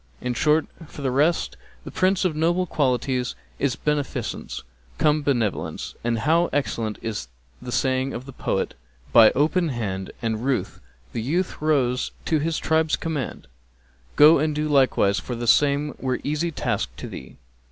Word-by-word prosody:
[FN#265] -, -, -13 dB
In 125 Hz, -, 0 dB
short, 150 Hz, +5 st, +3 dB, 0.2 s
for 145 Hz, -, -10 dB
the 130 Hz, -, +1 dB
rest, 150 Hz, +6 st, +1 dB, 0.3 s
the -, -, -8 dB
Prince 185 Hz, +1 st, +2 dB
of 170 Hz, -4 st, +1 dB
noble 170 Hz, +4 st, +1 dB
qualities 130 Hz, -4 st, 0 dB, 0.2 s
is 140 Hz, -3 st, +1 dB
Beneficence 150 Hz, -2 st, -3 dB, 0.3 s
cum 150 Hz, 0 st, +3 dB
Benevolence; 120 Hz, -8 st, -1 dB
and 115 Hz, 0 st, 0 dB
how 165 Hz, +8 st, +2 dB
excellent 115 Hz, -6 st, -1 dB
is 105 Hz, -, -4 dB, 0.3 s
the -, -, -6 dB
saying 130 Hz, 0 st, +1 dB
of 125 Hz, 0 st, -6 dB
the 135 Hz, -, -10 dB
poet, -, -, -2 dB, 0.4 s
By 115 Hz, -2 st, +9 dB
open 160 Hz, +4 st, +2 dB
hand 100 Hz, -7 st, -3 dB
and 115 Hz, 0 st, -2 dB
ruth 135 Hz, 0 st, -1 dB, 0.3 s
the 115 Hz, -, -2 dB
youth 170 Hz, +10 st, -1 dB
rose 130 Hz, -5 st, +1 dB
to 160 Hz, -, +2 dB
his 160 Hz, +2 st, -1 dB
tribe's 160 Hz, 0 st, +2 dB
command; 155 Hz, -6 st, -4 dB, 0.4 s
* -, -, -33 dB
Go 150 Hz, +1 st, +8 dB
and 155 Hz, 0 st, 0 dB
do 150 Hz, 0 st, -1 dB
likewise 130 Hz, -8 st, +3 dB
for 125 Hz, -, -5 dB
the 120 Hz, +1 st, -4 dB
same 145 Hz, +4 st, +3 dB
were 130 Hz, -1 st, -1 dB
easy 155 Hz, +4 st, -1 dB
task 155 Hz, -, -2 dB
to -, -, -6 dB
thee.' 65 Hz, -, -10 dB
140 Hz, 165 wpm, -24 LUFS, 120-155 Hz, 0.4 s, By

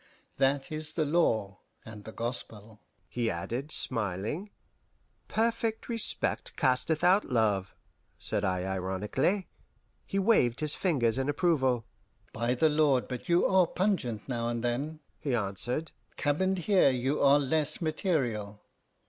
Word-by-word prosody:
That 135 Hz, +4 st, +1 dB
is 155 Hz, 0 st, -5 dB
the 155 Hz, -2 st, 0 dB
law 115 Hz, -, +1 dB, 0.3 s
and 105 Hz, -2 st, -10 dB
the 110 Hz, -, -7 dB
gospel," 110 Hz, -2 st, -6 dB, 0.3 s
he 120 Hz, -2 st, -1 dB
added, 115 Hz, -, -4 dB
smiling. 115 Hz, -, -1 dB, 0.8 s
"Perfect 225 Hz, 0 st, -1 dB
respect 230 Hz, -2 st, +1 dB
casteth 130 Hz, +5 st, +1 dB
out 185 Hz, +3 st, +5 dB
love" 105 Hz, -6 st, 0 dB, 0.4 s
said 100 Hz, -, -1 dB
I 90 Hz, -2 st, 0 dB
ironically. 95 Hz, -, -1 dB, 0.6 s
He 195 Hz, -, -4 dB
waved 190 Hz, -, +3 dB
his 150 Hz, -1 st, +2 dB
fingers 135 Hz, -, +1 dB
in 135 Hz, +2 st, -1 dB
approval. 135 Hz, -7 st, +1 dB, 0.5 s
"By 120 Hz, +2 st, 0 dB
the 160 Hz, +6 st, +3 dB
Lord, 150 Hz, -4 st, +2 dB
but 125 Hz, +3 st, -7 dB
you 170 Hz, +1 st, +4 dB
are 190 Hz, -2 st, +4 dB
pungent 165 Hz, -, -1 dB
now 120 Hz, -3 st, -2 dB
and 120 Hz, 0 st, -3 dB
then!" 140 Hz, +6 st, -2 dB, 0.2 s
he 140 Hz, -5 st, -1 dB
answered; 120 Hz, -, -2 dB, 0.3 s
"cabined 185 Hz, +6 st, +1 dB
here 195 Hz, -8 st, +5 dB
you 130 Hz, +3 st, -1 dB
are 140 Hz, 0 st, +6 dB
less 150 Hz, +2 st, -1 dB
material. 130 Hz, -, -1 dB
130 Hz, 130 wpm, -29 LUFS, 115-160 Hz, 0.8 s, are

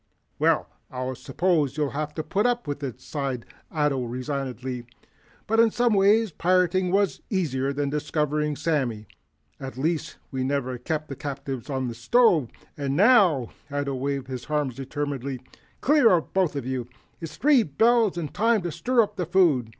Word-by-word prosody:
"Well, -, -, +2 dB, 0.2 s
I 130 Hz, 0 st, -4 dB
suppose 145 Hz, +1 st, 0 dB
I'll 150 Hz, -2 st, 0 dB
have 150 Hz, +1 st, -4 dB
to 155 Hz, -, -3 dB
put 205 Hz, +8 st, +1 dB
up 240 Hz, -6 st, -1 dB
with 145 Hz, 0 st, -4 dB
it," 130 Hz, -3 st, -5 dB
sighed 135 Hz, -3 st, -4 dB, 0.2 s
Ato 150 Hz, -4 st, 0 dB
resignedly. 130 Hz, -1 st, -4 dB, 0.6 s
"But 225 Hz, +1 st, +1 dB
in 230 Hz, 0 st, +6 dB
some 240 Hz, +1 st, +2 dB
ways 205 Hz, +2 st, +4 dB
pirating 180 Hz, +2 st, +2 dB
was 200 Hz, +1 st, +1 dB
easier 140 Hz, -, 0 dB
than 140 Hz, 0 st, -2 dB
discovering, 150 Hz, 0 st, -1 dB
Sammy. 135 Hz, -9 st, -1 dB, 0.5 s
At 130 Hz, -2 st, -7 dB
least, 160 Hz, +3 st, -2 dB
we 130 Hz, -2 st, -2 dB
never 130 Hz, -2 st, -1 dB
kept 155 Hz, 0 st, -3 dB
the 135 Hz, -, -6 dB
captives 135 Hz, -2 st, -5 dB
on 130 Hz, -2 st, -1 dB
the 120 Hz, -, -4 dB
stove. 155 Hz, -, +3 dB, 0.3 s
And 140 Hz, -1 st, -2 dB
NOW 185 Hz, -, +5 dB
" -, -, -27 dB
Ato 145 Hz, -1 st, -2 dB
waved 135 Hz, 0 st, -2 dB
his 130 Hz, -2 st, -6 dB
arms 150 Hz, -4 st, 0 dB
determinedly. 135 Hz, 0 st, -4 dB, 0.4 s
"Clear 290 Hz, -4 st, +5 dB
out, 170 Hz, -3 st, +1 dB
both 185 Hz, -6 st, +1 dB
of 140 Hz, -4 st, -3 dB
you. 130 Hz, -2 st, -3 dB, 0.3 s
It's 165 Hz, -2 st, -8 dB
three 285 Hz, -3 st, +5 dB
bells 220 Hz, -, +2 dB
and 155 Hz, -4 st, -4 dB
time 225 Hz, -2 st, +2 dB
to 175 Hz, -, -2 dB
stir 245 Hz, +6 st, +2 dB
up 205 Hz, -, -7 dB
the 180 Hz, -4 st, -2 dB
food. 165 Hz, -11 st, +3 dB
145 Hz, 170 wpm, -25 LUFS, 130-185 Hz, 0.6 s, in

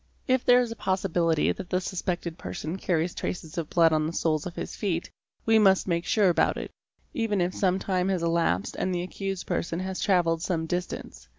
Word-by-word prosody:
| -, -, -38 dB
If 260 Hz, -, -3 dB
there 245 Hz, 0 st, +6 dB
is 240 Hz, -2 st, -2 dB
a -, -, -5 dB
possibility 175 Hz, -5 st, +1 dB
that 175 Hz, -, -6 dB
the 185 Hz, -, +1 dB
suspected 180 Hz, -2 st, -3 dB
person 165 Hz, +1 st, -5 dB
carries 175 Hz, -1 st, 0 dB
traces 160 Hz, -3 st, -5 dB
of 160 Hz, -, -4 dB
blood 165 Hz, -2 st, +4 dB
on 155 Hz, 0 st, +2 dB
the 165 Hz, -, -4 dB
soles 160 Hz, -1 st, 0 dB
of 175 Hz, -, -8 dB
his -, -, -5 dB
feet, 175 Hz, -5 st, -2 dB, 0.3 s
we 225 Hz, 0 st, +5 dB
must 195 Hz, -2 st, +4 dB
make 170 Hz, -1 st, 0 dB
sure 210 Hz, -6 st, +4 dB
about 175 Hz, -, +2 dB
it, -, -, -6 dB, 0.4 s
even 225 Hz, -7 st, 0 dB
if 175 Hz, +1 st, 0 dB
some 185 Hz, -1 st, +1 dB
time 185 Hz, -1 st, 0 dB
has 185 Hz, -3 st, 0 dB
elapsed 165 Hz, -, +1 dB
and 185 Hz, -1 st, 0 dB
the 175 Hz, -, -1 dB
accused 195 Hz, 0 st, -4 dB
person 170 Hz, 0 st, -2 dB
has 190 Hz, 0 st, -4 dB
travelled 170 Hz, -4 st, +2 dB
some 165 Hz, -2 st, -1 dB
distance. 160 Hz, -, -5 dB
180 Hz, 210 wpm, -27 LUFS, 165-190 Hz, 0.4 s, there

